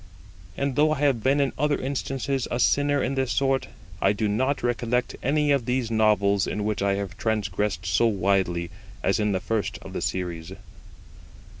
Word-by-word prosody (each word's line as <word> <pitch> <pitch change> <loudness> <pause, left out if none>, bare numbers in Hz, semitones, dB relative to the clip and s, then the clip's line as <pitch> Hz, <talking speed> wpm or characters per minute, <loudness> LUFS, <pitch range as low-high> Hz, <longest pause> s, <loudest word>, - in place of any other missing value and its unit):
And 140 -2 -1
though 155 +2 +4
I 150 - -4
have 135 -6 +2
been 135 +5 +2
in 140 -2 +1
other 150 0 +2
instances 135 0 -2
a 120 - -2
sinner 145 +1 +2
in 135 - -1
this 130 -2 -1
sort, 135 -1 +1 0.3
I 100 - +4
do 105 +1 -1
not 130 +7 0
recollect 120 0 0
any 145 +2 +2
of 140 -4 +2
these 125 -2 0
novels 105 -3 +3
in 105 - -2
which 105 -1 -1
I 100 0 +2
have 100 -1 -5
transgressed 105 -4 -1
so 95 +6 +3
widely 95 -4 0 0.3
as 100 - +2
in 105 -1 +1
the 95 - 0
first 110 +3 -2
of - - -9
the - - -3
series. 85 -3 -3
115 Hz, 180 wpm, -25 LUFS, 100-135 Hz, 0.3 s, though